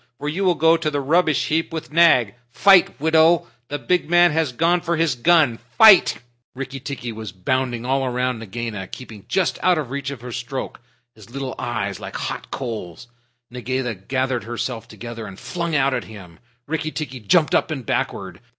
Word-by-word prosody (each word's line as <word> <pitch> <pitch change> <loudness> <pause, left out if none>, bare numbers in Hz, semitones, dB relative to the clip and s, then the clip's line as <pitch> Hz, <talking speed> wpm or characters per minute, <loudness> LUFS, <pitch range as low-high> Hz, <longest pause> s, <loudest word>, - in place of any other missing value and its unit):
For 145 - -6
you 170 +7 -2
will 180 -2 +3
go 165 +1 +4
to 165 -2 -1
the 145 -1 -2
rubbish 155 +2 +1
heap 160 +2 0
with 160 -2 -6
Nag. 155 -10 +5 0.2
Fight, 190 +8 +4
widow! 160 +2 +4 0.2
The 145 - -3
big 175 +2 0
man 175 0 +5
has 160 -3 0
gone 170 +7 +1
for 170 -1 -1
his 165 -3 +2
gun! 140 -2 +3 0.2
Fight!" 210 - +7 0.4
Rikki 135 +1 -6
tikki 130 -3 -6
was 110 -3 -7
bounding 120 +5 -2
all 135 0 0
round 125 -1 -1
Nagaina, 110 -2 -5
keeping 110 -4 -11
just 185 -3 0
out 180 -2 +3
of 140 -5 -4
reach 140 0 -3
of 140 -4 -7
her 125 0 -8
stroke, 125 +3 -5 0.3
his 110 -3 -16
little 135 +1 -5
eyes 100 -5 -3
like - - -8
hot - - -5
coals. 115 -4 -6 0.4
Nagaina 125 0 -3
gathered 130 +5 -2
herself 120 0 -4
together 115 -2 -8
and 95 -1 -11
flung 170 +6 -3
out 135 -1 +2
at - - -2
him. 95 -6 -13 0.3
Rikki 155 +1 -2
tikki 145 -5 -6
jumped 150 - +2
up - - +2
and 135 -6 -5
backward. 95 -4 -3
130 Hz, 185 wpm, -21 LUFS, 120-160 Hz, 0.4 s, Fight